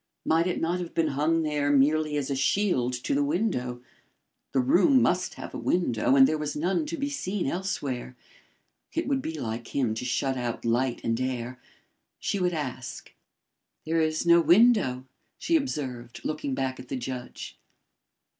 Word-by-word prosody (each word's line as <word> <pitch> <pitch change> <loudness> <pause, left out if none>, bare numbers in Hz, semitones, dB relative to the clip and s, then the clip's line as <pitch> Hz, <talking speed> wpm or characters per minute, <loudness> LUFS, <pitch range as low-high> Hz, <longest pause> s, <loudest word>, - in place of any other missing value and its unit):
Might 165 +2 +3
it 180 - -1
not 175 +2 0
have 175 -2 -6
been 160 -2 +2
hung 155 +4 +1
there 150 -2 0
merely 150 +2 +3
as 140 -1 -2
a - - 0
shield 135 -3 +1
to 125 0 -2
the 145 +1 +2
window. 140 - -1 0.7
The 135 - +1
room 190 - +5
must 185 -6 +1
have - - -8
a - - -5
window 130 -8 +1
and 135 -1 +8
there 155 0 -1
was 150 -1 -3
none 185 - 0
to 330 - -4
be 280 -1 -1
seen 210 -9 -3
elsewhere. 140 -7 -3 0.8
It 330 - -1
would 270 -1 +1
be 160 -8 -5
like 115 -1 -5
him 125 -6 +1
to 110 - -4
shut 130 +2 -1
out 120 -2 -3
light 120 +2 +1
and 115 +2 0
air. 130 -1 -3 0.6
She 200 - -1
would 180 -1 +1
ask. 125 -4 -6 0.7
"There 165 +1 +1
is 155 +1 0
no 170 0 +6
window," 175 - +4 0.3
she 335 - 0
observed, 130 - -3
looking 150 -3 -2
back 130 -1 -2
at 125 - -10
the 135 - -3
judge. 125 0 -7
145 Hz, 175 wpm, -27 LUFS, 125-175 Hz, 0.8 s, and